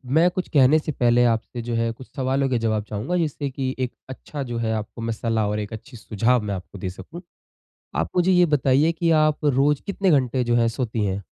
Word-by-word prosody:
मैं 170 +3 +5
कुछ 185 0 -3
कहने 145 +2 +5
से 155 - -4
पहले 120 -2 +3
आपसे 115 +2 -5
जो 120 0 -3
है, 115 0 0
कुछ 125 +3 -12
सवालों 135 +1 0
के 125 - +1
जवाब 110 -1 0
चाहूँगा, 110 - -3
जिससे 150 -3 -2
कि 130 0 -3
एक 125 -1 -2 0.2
अच्छा 140 +2 -6
जो 115 - -2
है, 110 - 0
आपको 110 +2 -5
में 115 0 -2
सलाह 110 -1 -1
और 105 0 -1
एक 105 +1 -5
अच्छी 120 +3 -10
सुझाव 115 +3 +1
मैं 100 - -1
आपको 95 +2 -9
दे 95 0 -4
सकूँ। 95 - -10 0.8
आप 80 - -1
मुझे 180 +1 +3
ये 180 -1 +5
बताइए 140 +5 +3
कि 165 0 0
आप 155 0 +1
रोज़ 145 +1 +2
कितने 195 -1 0
घंटे 130 -4 +2
जो 120 0 +1
है, 115 -1 +3
सोती 115 -2 -2
हैं? 95 +1 -2
125 Hz, 225 wpm, -23 LUFS, 110-145 Hz, 0.8 s, मैं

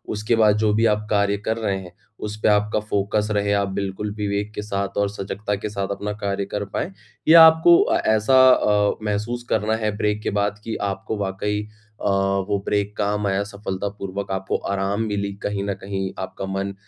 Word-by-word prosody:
उसके 105 +3 +1
बाद 105 -2 +4
जो 105 -1 +2
भी 110 +2 +2
आप 105 -1 +1
कार्य 100 -1 +2
कर 110 - 0
रहे 100 -4 -1
हैं, 90 -2 -11 0.3
उसपे 105 0 -3
आपका 105 +1 +2
फोकस 105 0 -1
रहे, 100 -1 +1
आप 100 -1 +1
बिल्कुल 100 +2 -3
विवेक 105 0 -2
के - - -3
साथ 100 -1 -3
और 100 0 +2
सजगता 105 +1 -4
के 100 +2 -5
साथ 100 -2 -3
अपना 105 +1 -3
कार्य 100 0 -1
कर 100 +1 -4
पाएँ? - - -2 0.4
या 165 +1 +9
आपको 160 +2 +7 0.3
ऐसा 110 +4 +3
अ, 105 -4 +3
महसूस 105 +3 -2
करना 110 +1 +1
है 105 -1 0
ब्रेक 105 0 0
के - - 0
बाद 100 0 -1
कि 115 0 -4 0.2
आपको 95 +3 -5
वाक़ई 105 +1 -2 0.4
अ, - - -5
वो 100 +1 +1
ब्रेक 105 0 -1
काम 105 0 0
आया 100 +1 +1
सफलतापूर्वक 100 -1 -5
आपको 95 0 -1 0.2
आराम 100 +2 -1
मिली 100 0 -2
कहीं 100 -1 -2
न - - +1
कहीं 95 -1 -3
आपका 95 +1 -5
मन 95 +1 -3
100 Hz, 190 wpm, -22 LUFS, 100-105 Hz, 0.4 s, या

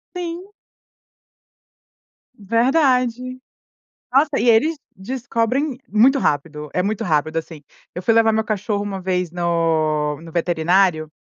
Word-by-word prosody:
Sim. 355 +2 -5 1.9
Verdade. 250 +2 +1 0.7
Nossa, 280 +3 +4
e 235 - 0
eles 300 +9 +3 0.2
descobrem 245 +5 -2
muito 245 +7 +4
rápido, 150 - -2
é 180 - +1
muito 205 +2 -2
rápido, 155 -1 0
assim. 160 -1 -6 0.3
Eu 180 - -5
fui 205 +5 +2
levar 225 0 +4
meu 220 0 0
cachorro 210 -1 -2
uma 195 -2 -5
vez 180 -2 -1
no 160 -4 0
no 165 0 -11
veterinário, 170 -1 +1
200 Hz, 115 wpm, -20 LUFS, 165-245 Hz, 1.9 s, Nossa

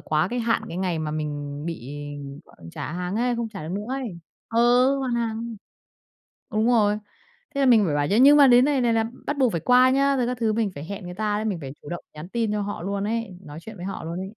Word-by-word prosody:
quá 155 +3 0
cái 245 - -3
hạn 230 -1 +1
cái 170 - -6
ngày 180 -3 -1
mà 155 -1 -2
mình 145 -1 -4
bị 150 -7 -6 0.5
gọi - - -21 0.2
trả 145 - -5
hàng 180 +2 -3
ấy, 245 +1 +1
không 230 -1 -2
trả 200 -5 -8
được 165 - -5
nữa 205 +1 -3
ấy 255 -9 -4 0.3
ừ, 245 +4 +4
hoàn 260 -3 -1
hàng. 230 0 -3 1.0
Đúng 215 +2 +1
rồi. 210 -3 +3 0.6
Thế 280 - +1
là - - +4
mình 225 -5 +6
phải 150 -5 0
bảo 145 0 +1
chứ 200 - +2
nhưng 285 +2 +8
mà 285 -2 +8
đến 245 0 +6
này 285 -2 +2
này 235 -1 +2
là 225 0 +2 0.2
bắt 290 - -1
buộc 260 -4 +3
phải 170 - -2
qua 250 +1 +5
nhá, 275 +1 +3
rồi 245 -2 +1
các 250 0 -2
thứ 225 -2 +1
mình 220 -2 0
phải 145 - -6
hẹn 200 +2 -7
người 180 - -6
ta 210 +1 -1
đấy, 215 - -2
mình 200 -6 -1
phải 135 -2 -6
chủ 145 - -10
động 175 - -5
nhắn 155 +3 -9
tin 225 0 -1
cho 210 0 -1
họ 205 -3 -4
luôn 200 +2 -2
ấy, 220 -3 -3
nói 150 +1 -9
chuyện 220 +5 -10
với 175 - -7
họ 195 - -5
luôn 170 +2 -4
ấy. 190 +1 -5
215 Hz, 265 wpm, -24 LUFS, 175-240 Hz, 1.0 s, nhưng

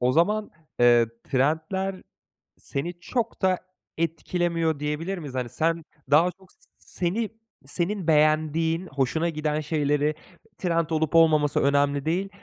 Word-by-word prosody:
O 125 +1 +2
zaman, 210 +7 +2 0.3
eee, 120 -1 +6 0.2
trendler 160 +8 0 0.6
seni 160 +6 -4
çok 235 +5 -3
da 185 -2 +3 0.4
etkilemiyor 165 -1 -1
diyebilir 150 +6 -2
miyiz? 145 -6 -7
Hani, 125 -2 -2
sen 165 +3 -1 0.3
daha 170 +5 +5
çok 190 0 -22
s - - -20 0.2
seni 200 +5 -2 0.4
senin 175 +5 -2
beğendiğin, 155 +3 +2
hoşuna 145 +5 0
giden 155 -1 -1
şeyleri 150 -1 0 0.4
trend 170 -3 0
olup 160 0 0
olmaması 155 -3 +4
önemli 140 0 +2
değil, 180 +5 0
160 Hz, 125 wpm, -25 LUFS, 150-175 Hz, 0.6 s, eee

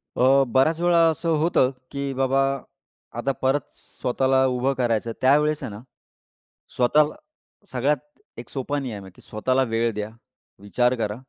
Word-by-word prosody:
अ, 135 +2 +4
बऱ्याच 135 +7 +2
वेळा 175 0 +3
असं 165 +1 -2
होतं, 135 -5 +3 0.2
की 140 -1 -3
बाबा 135 +1 +1 0.8
आता 130 +3 0
परत 135 +2 +2
स्वतःला 130 +1 0
उभं 130 +1 0
करायचं. 115 -2 0
त्यावेळेस 150 +3 +3
आहे - - -4
ना, 100 +2 -9 0.9
स्वतःला 150 +5 +3 0.6
सगळ्यात 135 +4 +1 0.4
एक 120 - -9
सोपा 145 +2 -3
नियम 110 -8 -6
आहे, 95 - -12
की - - -18
स्वतःला 130 +5 0
वेळ 115 +1 +1
द्या, 105 0 -4 0.5
विचार 125 +5 +1
करा 105 -3 -2
130 Hz, 145 wpm, -23 LUFS, 120-140 Hz, 0.9 s, अ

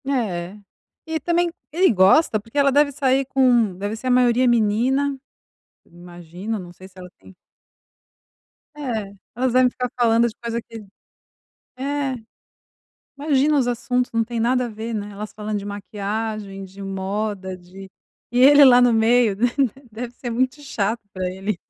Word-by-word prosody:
É. 205 -9 -2 0.5
E 320 0 -3
também 345 +3 +1 0.2
ele 360 +2 +3
gosta, 210 - +4
porque 225 +6 -11
ela 280 -1 +4
deve 285 +1 +3
sair 270 -1 +1
com 245 -7 +2
deve 205 +3 -3
ser 240 +3 -7
a - - +2
maioria 250 0 +3
menina, 245 +5 +1 0.7
imagino, 175 +4 -8
não 175 -2 -10
sei 185 +2 -14
se 190 0 -21
ela 180 0 -9
tem 195 - -17 1.4
É, 225 -9 -4 0.2
elas 255 +1 0
devem 255 0 +5
ficar 250 0 -4
falando 230 0 +4
de 230 - -8
coisa 235 0 -3
que 225 -1 -11 1.0
É, 275 0 -2 1.0
imagina 290 0 +2
os 260 - +1
assuntos, 245 +1 -1
não 230 0 +1
tem 235 0 -4
nada 250 +2 +1
a - - -6
ver, 225 +1 -6
né. 205 -1 -4
Elas 210 +1 -7
falando 210 0 -4
de 200 - -8
maquiagem, 205 0 -5
de 190 +1 -11
moda, 195 0 -4
de 185 +2 -13 0.4
e 245 - +2
ele 285 +2 +8
lá 250 -2 +7
no 245 -1 +4
meio 225 -1 +3
deve 245 +3 0 0.4
deve 235 +2 -6
ser 245 -1 -6
muito 255 +5 -1
chato 225 -5 -2
pra 185 -1 -3
ele. 190 +2 -3
230 Hz, 160 wpm, -22 LUFS, 200-255 Hz, 1.4 s, ele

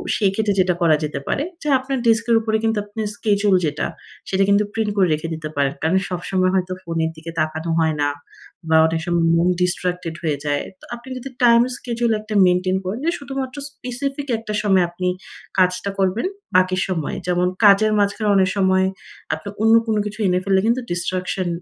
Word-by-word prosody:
সেই 200 -3 +2
ক্ষেত্রে 210 0 +1
যেটা 180 -1 +3
করা 165 -2 +5
যেতে 150 -2 -3
পারে 280 - 0 0.2
যে - - -6
আপনার 265 +1 -3
ডেস্কের 230 +1 +3
উপরে 220 0 0
কিন্তু 225 -1 +1
আপনার 210 +1 -4
স্কেডিউল 205 -2 +2
যেটা 150 -1 -1 0.4
সেটা 195 0 +2
কিন্তু 200 +1 +4
প্রিন্ট 220 -2 -1
করে 190 -2 +4
রেখে 155 +2 -3
দিতে 155 -1 -5
পারেন। 140 -1 +1
কারণ 165 +4 +2
সবসময় 185 +1 0
হয়তো 185 0 0
ফোনের 165 -2 -1
দিকে 160 +1 -8
তাকানো 155 +1 -2
হয় 160 -1 +2
না, 145 - +2 0.6
বা 160 - +5
অনেক 165 0 -1
সময় 170 -1 +1
মন 170 +1 +3
ডিসট্রাক্টেড 180 -1 -1
হয়ে 155 -3 0
যায়। 145 -1 0 0.2
তো - - -15
আপনি 240 +2 -13
যদি 260 +2 -7
টাইম 235 -1 +7 0.2
স্কেডিউল 235 -1 -1
একটা 215 0 -7
মেইনটেইন 185 +1 +2
করেন 195 +6 -3
যে 335 - +2
শুধুমাত্র 270 -2 -5 0.2
স্পেসিফিক 275 +2 -5
একটা 220 -1 -6
সময় 190 -3 +4
আপনি 180 +1 -3 0.5
কাজটা 185 +2 +2
করবেন 195 - +1 0.3
বাকি 185 0 +2
সময়ে 165 -6 -2
যেমন 180 0 +2 0.2
কাজের 205 +2 +6
মাঝখানে 205 +1 +1
অনেক 190 -1 +4
সময় 190 -1 +3 0.5
আপনি 200 - -8
অন্য 225 +1 +5
কোন 220 - +1
কিছু 210 +1 -6
এনে 180 0 +2
ফেললে 190 -1 +2
কিন্তু 240 +3 +2
ডিসট্রাকশন 180 +1 -2
190 Hz, 185 wpm, -21 LUFS, 175-220 Hz, 0.6 s, টাইম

